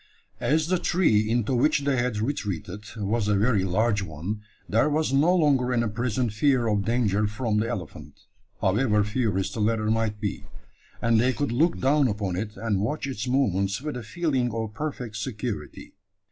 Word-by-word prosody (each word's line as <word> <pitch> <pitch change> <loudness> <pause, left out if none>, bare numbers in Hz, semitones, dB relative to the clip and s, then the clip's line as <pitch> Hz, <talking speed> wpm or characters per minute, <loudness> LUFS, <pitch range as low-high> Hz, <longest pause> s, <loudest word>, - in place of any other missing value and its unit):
As 155 +2 +2
the 185 0 +1
tree 110 - +2
into 120 +2 +1
which 140 +4 +3
they 140 -1 +1
had 120 -3 0
retreated 105 - -3
was 105 +1 -1
a 105 - +3
very 105 -2 +2
large 105 +3 +1
one, 95 +5 -5 0.3
there 115 +7 +2
was 150 -2 0
no 155 +7 +4
longer 140 -7 +3
any 115 -2 +1
present 120 0 -1
fear 130 +1 +2
of 105 -3 +1
danger 110 -3 +1
from 110 0 -1
the 115 +2 -1
elephant, 95 -9 -7 0.4
however 105 +1 +2
furious 105 -3 -1
the - - -5
latter 110 0 +1
might 110 -2 0
be; 100 -1 -4 0.6
and 115 -1 +4
they 130 +2 +2
could 145 0 -2
look 155 +9 +2
down 140 +1 +3
upon 100 -4 -2
it 105 +3 -4
and 105 -4 -1
watch 140 +10 -2
its 130 -3 -4
movements 100 -6 +1
with 150 +1 -5
a 125 - -4
feeling 130 0 -1
of 110 -1 -4
perfect 125 -5 -5
security. 105 - -5
115 Hz, 175 wpm, -26 LUFS, 105-130 Hz, 0.6 s, no